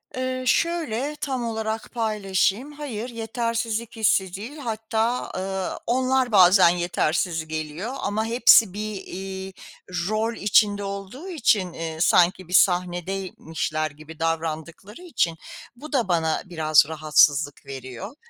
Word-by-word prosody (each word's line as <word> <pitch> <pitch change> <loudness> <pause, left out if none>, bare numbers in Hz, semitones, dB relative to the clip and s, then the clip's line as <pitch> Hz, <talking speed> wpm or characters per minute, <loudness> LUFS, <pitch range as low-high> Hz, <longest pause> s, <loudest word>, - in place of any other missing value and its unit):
Eee, 255 0 -2
şöyle 300 -4 0
tam 260 -4 -2
olarak 220 -1 -3
paylaşayım. 215 +3 0
Hayır, 255 -6 -6
yetersizlik 230 0 -3
hissi 190 -4 +2
değil 235 +10 -8
hatta, 225 -1 -2
ııı, 190 0 -3
onlar 255 0 +1
bazen 185 -2 +7
yetersiz 170 -1 -1
geliyor 155 - -4
ama 215 +2 -1
hepsi 230 -3 +6
bir, 210 0 -4
iii, 190 0 -7 0.6
rol 220 +2 0
içinde 205 0 +3
olduğu 200 - -6
için, 210 - +1
ııı, 160 -1 -5
sanki 180 +1 +3
bir 180 - -8
sahnedeymişler 175 -4 0
gibi 155 +2 -13
davrandıkları 165 - -4
için 170 - -1 0.4
bu 300 +5 -11
da 245 -7 +1
bana 160 -3 +1
biraz 155 -4 +4
rahatsızlık 150 -2 +2
veriyor. 130 - -8
195 Hz, 120 wpm, -24 LUFS, 170-230 Hz, 0.6 s, bazen